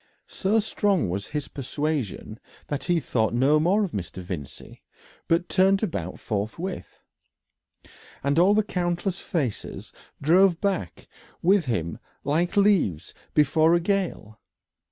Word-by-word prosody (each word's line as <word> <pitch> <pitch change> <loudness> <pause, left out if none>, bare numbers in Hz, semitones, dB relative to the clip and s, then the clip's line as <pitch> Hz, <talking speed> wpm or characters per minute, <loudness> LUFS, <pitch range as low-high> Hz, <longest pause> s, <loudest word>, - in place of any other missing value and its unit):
So 205 +3 0
strong 205 - +1
was 100 +4 -4
this 150 -1 -3
persuasion 140 -5 -3 0.3
that 145 -1 -3
he 175 -1 +2
thought 115 -6 0
no 140 +5 +4
more 190 +7 +3
of 190 - -3
Mr. 95 - -5
Vincey, 85 -6 -8 0.5
but 170 +2 +2
turned 195 +2 +3
about 95 - -3
forthwith, 115 - -5 1.2
and 140 +3 +2
all 195 +4 +5
the 215 - +3
countless 180 0 -2
faces 140 - -4 0.3
drove 175 +3 +4
back 190 - -2 0.4
with 185 0 +4
him 85 - -2 0.2
like 165 +7 0
leaves 195 - +2 0.2
before 155 +3 +4
a - - +3
gale. 175 - -2
160 Hz, 125 wpm, -25 LUFS, 120-190 Hz, 1.2 s, all